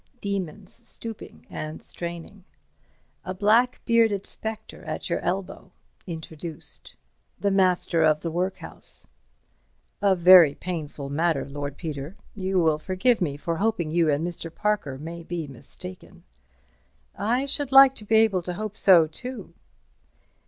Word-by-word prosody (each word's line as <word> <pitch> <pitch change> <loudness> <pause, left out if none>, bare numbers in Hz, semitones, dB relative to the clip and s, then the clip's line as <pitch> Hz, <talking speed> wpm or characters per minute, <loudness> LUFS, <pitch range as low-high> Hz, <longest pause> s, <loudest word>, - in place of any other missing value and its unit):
Demons 200 -1 -5
stooping 230 -1 -9
and 155 +1 -6
straining. 170 +3 -8 0.8
A 185 0 -5
black 225 +6 +3
bearded 225 -4 +3
spectre 220 0 -6
at - - -5
your - - +1
elbow. 195 +1 -4 0.3
Introduced. 160 -1 -8 0.4
The 200 - +1
Master 185 -3 +2
of 155 -1 +3
the 165 - -3
Workhouse. 180 +3 -2 1.0
"A 200 -2 +4
very 175 -4 +8
painful 150 -5 -5
matter, 160 -1 0
Lord 145 0 -5
Peter. 155 +1 -6 0.2
You 190 -1 -2
will 160 -3 +2
forgive 195 +7 +1
me 145 -5 -1
for 165 +2 -3
hoping 205 -6 0
you 165 -1 +3
and 150 +2 +1
Mr. 170 -1 -5
Parker 205 -8 -1
may 165 +4 -7
be 170 -1 -4
mistaken." 180 +7 -10 0.9
"I 240 +6 0
should 280 -1 -1
like 270 0 +9
to 220 - -7
be 220 +2 +1
able 220 -4 +4
to 175 +1 -5
hope 215 +1 -5
so 180 -6 +6
too." 245 +12 -7
180 Hz, 135 wpm, -25 LUFS, 160-210 Hz, 1.0 s, like